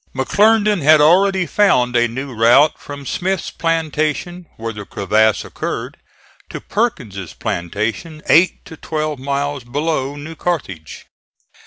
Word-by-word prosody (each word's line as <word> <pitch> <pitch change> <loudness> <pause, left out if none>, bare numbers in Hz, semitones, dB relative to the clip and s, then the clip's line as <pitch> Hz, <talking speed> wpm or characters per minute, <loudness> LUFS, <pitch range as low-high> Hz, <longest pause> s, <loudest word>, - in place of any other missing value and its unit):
McClernand 210 +7 +3
had 155 +2 +6
already 185 +4 +4
found 130 -10 +2
a 120 0 +3
new 130 +3 -6
route 120 +7 +4
from 145 -1 -9
Smith's 185 +5 -2
plantation 165 +1 -2
where 115 0 -5
the 105 -1 -7
crevasse 110 +2 +1
occurred, - - -5 0.5
to - - -6
Perkins' 120 - -3
plantation, 110 - -4
eight 175 +4 +3
to 160 - -10
twelve 155 -3 -3
miles 140 0 -2
below 140 +2 -2
New 150 +3 -8
Carthage. 130 - -4
145 Hz, 125 wpm, -18 LUFS, 120-170 Hz, 0.5 s, had